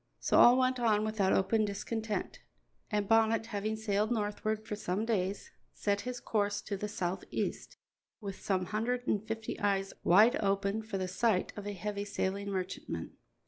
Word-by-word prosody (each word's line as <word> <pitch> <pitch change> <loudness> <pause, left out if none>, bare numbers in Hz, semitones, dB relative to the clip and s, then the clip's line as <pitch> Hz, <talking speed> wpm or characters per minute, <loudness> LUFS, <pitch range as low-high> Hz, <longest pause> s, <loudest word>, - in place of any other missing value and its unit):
So - - +3
all 245 +1 +8
went 255 0 +2
on 215 -3 +3
without 215 -3 +1
open 215 +3 +3
discontent, 215 +1 -3 0.5
and 210 -2 0
Bonnet, 225 0 +3
having 215 -1 -2
sailed 215 -1 0
northward 215 0 -1
for 210 - -3
some 205 +1 -2
days, 200 -3 -1 0.2
set 205 -1 0
his 250 -1 -4
course 205 -3 0
to 200 - -3
the 210 +2 -3
southeast, 185 -2 -3 0.4
with 200 -4 -7
some 185 -2 0
hundred 240 +5 -1
and 205 -1 +1
fifty 225 0 -4
eyes 195 -1 0
wide 220 +9 +6
open 200 0 0
for 215 -2 -4
the 185 -1 -2
sight 190 +1 +1
of 205 -1 -6
a 205 - -3
heavy 200 +1 -3
sailing 200 0 -2
merchantman. 190 -1 -4
210 Hz, 165 wpm, -32 LUFS, 200-220 Hz, 0.5 s, all